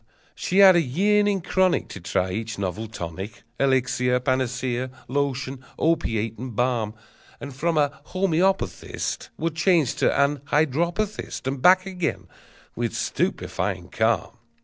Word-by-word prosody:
She 185 - -2
had 195 -2 +9
a 175 - +5
yearning 200 +7 +2
chronic 185 +1 +1
To - - -8
try 90 +1 -1
each 110 +3 -4
novel 100 +3 -3
tonic, 95 +2 -7 0.2
Elixir, 125 -2 +2
panacea, 130 -1 -1 0.2
lotion, 135 -1 -2
opiate, 115 -9 0
and 125 -2 -6
balm; 115 -3 0 0.4
And 140 - -7
from 165 +3 0
a 145 0 +1
homoeopathist 190 0 -1
Would 165 0 -1
change 170 -6 +3
to - - +3
an 140 +1 +3
hydropathist, 170 +9 -1
And 135 0 -2
back 185 +4 +6
again, 180 -4 -3 0.5
with 120 -1 -2
stupefying 95 -2 -2
calm! 115 +1 0
135 Hz, 125 wpm, -24 LUFS, 115-170 Hz, 0.5 s, had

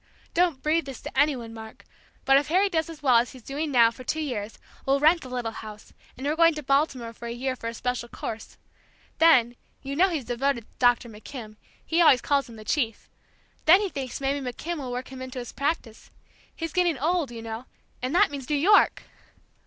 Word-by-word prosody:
Don't 340 -6 +1
breathe 315 +1 +1
this 270 -2 -8
to - - -8
any 290 +1 +4
one, 230 -2 -8
Mark, 220 -1 -11 0.4
but 270 - +5
if 280 +1 +3
Harry 375 +5 +3
does 325 -3 -1
as 315 -2 -10
well 255 -4 +5
as 235 +2 +1
he's 255 -3 -13
doing 295 +5 -3
now 235 -3 +5
for 255 - -11
two 310 - -2
years, 225 -8 -4 0.3
we'll 275 +1 +2
rent 315 +4 +4
the 255 - -9
little 245 -3 -3
house, 215 -1 -10 0.2
and 260 - -6
we're 295 +2 +1
going 330 -1 +5
to 300 - -6
Baltimore 270 -4 0
for 235 +1 -9
a - - -4
year 255 +2 -2
for 230 - -7
a 230 - -3
special 250 0 -3
course. 220 -1 -7 0.6
Then 245 -8 +5 0.3
you 275 0 -4
know 375 +5 +4
he's 310 -8 -3
devoted 245 +1 0
to - - -30
Dr. 245 -1 +3
McKim, 220 0 -9 0.3
he 330 +2 +2
always 285 -6 +7
calls 280 0 0
him 230 - -11
'the 215 -1 -11
chief,' 230 -2 -2 0.5
then 345 +5 +8
he 405 -2 -1
thinks 265 -6 -5
maybe 275 +1 -1
McKim 310 +7 -4
will 260 -3 -5
work 250 +1 -5
him 260 -1 -8
into 260 0 -7
his 240 -1 -6
practice, 280 -6 -3 0.5
he's 330 -2 -5
getting 350 -4 +2
old, 320 +1 0
you 230 -1 -8
know, 225 +2 -6 0.4
and 255 +6 -2
that 395 -3 +5
means 275 -3 -7
New 300 - +2
York!" 380 +9 +4
270 Hz, 220 wpm, -26 LUFS, 240-310 Hz, 0.6 s, then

